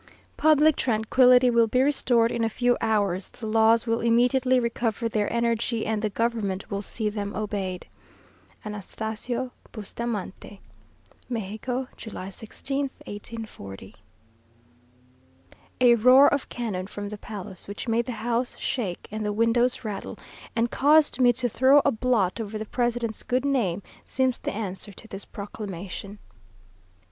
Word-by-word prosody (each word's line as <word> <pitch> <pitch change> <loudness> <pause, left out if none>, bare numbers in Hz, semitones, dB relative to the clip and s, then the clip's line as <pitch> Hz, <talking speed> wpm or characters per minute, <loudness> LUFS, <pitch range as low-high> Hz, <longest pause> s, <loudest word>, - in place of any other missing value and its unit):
Public 310 0 +4
tranquillity 250 +2 +4
will 235 -1 +4
be 250 +3 +1
restored 245 -5 +2
in 235 - -1
a 225 - +2
few 245 +2 +2
hours; 200 -4 0
the 235 - -9
laws 225 +1 +4
will 230 -1 +1
immediately 250 +2 +3
recover 235 -1 -1
their 210 -2 -1
energy, 235 -1 0
and 220 -1 -1
the 215 - 0
government 210 -3 -2
will 200 0 -2
see 215 +2 -3
them 205 -1 -3
obeyed. 195 -3 -3 0.8
"ANASTASIO 220 +4 -4 0.2
BUSTAMANTE." 210 -2 -5 0.7
"Mexico, 240 +3 -3
July 195 -4 -7
16th, 270 +7 -4 0.2
1840." 205 - -8 1.8
A 245 -1 +7
roar 255 +5 +7
of 285 - -2
cannon 205 -6 -3
from 205 0 -6
the 210 - -6
Palace, 195 -4 -8
which 200 +4 -6
made 230 +1 +1
the 250 - -3
house 240 +1 0
shake 200 -9 -3
and 215 0 -3
the 210 - -1
windows 230 +3 +2
rattle, 205 -2 -5 0.4
and 230 +1 +1
caused 295 -1 +4
me 245 -1 +6
to 245 +1 -1
throw 260 +5 +5
a 280 - +4
blot 230 -4 +1
over 215 0 -5
the 215 - -5
President's 240 -1 -1
good 255 +2 -1
name, 205 -10 0 0.2
seems 260 -2 0
the - - -3
answer 205 -1 -5
to 220 - -13
this 195 -2 -8
proclamation. 200 -1 -7
225 Hz, 140 wpm, -26 LUFS, 205-245 Hz, 1.8 s, A